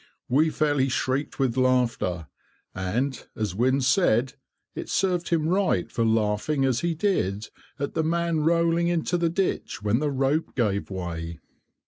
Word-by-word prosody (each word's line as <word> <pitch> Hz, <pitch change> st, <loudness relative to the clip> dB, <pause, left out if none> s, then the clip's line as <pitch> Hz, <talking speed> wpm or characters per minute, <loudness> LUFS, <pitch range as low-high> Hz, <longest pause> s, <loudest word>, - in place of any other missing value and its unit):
We 150 Hz, +6 st, +3 dB
fairly 145 Hz, -3 st, +1 dB
shrieked 130 Hz, +2 st, -1 dB
with 130 Hz, -4 st, 0 dB
laughter, 125 Hz, -10 st, +1 dB, 0.5 s
and, 115 Hz, +8 st, -2 dB
as 105 Hz, -4 st, -2 dB
Wynne 130 Hz, +6 st, +2 dB
said, 130 Hz, -, +2 dB, 0.4 s
it -, -, -6 dB
served 180 Hz, -2 st, 0 dB
him 160 Hz, -2 st, +1 dB
right, 185 Hz, -, +1 dB
for 115 Hz, -, 0 dB
laughing 110 Hz, +6 st, +1 dB
as 130 Hz, -3 st, +1 dB
he 170 Hz, -1 st, -1 dB
did 115 Hz, -, -1 dB, 0.3 s
at 140 Hz, -, -3 dB
the 160 Hz, -, 0 dB
man 170 Hz, 0 st, 0 dB
rolling 170 Hz, +2 st, +2 dB
into 175 Hz, 0 st, 0 dB
the 170 Hz, -1 st, +1 dB
ditch, 180 Hz, -, -2 dB
when 105 Hz, +3 st, +2 dB
the 150 Hz, 0 st, 0 dB
rope 140 Hz, +3 st, 0 dB
gave 105 Hz, -5 st, 0 dB
way. 85 Hz, -3 st, -5 dB
135 Hz, 150 wpm, -25 LUFS, 110-165 Hz, 0.5 s, We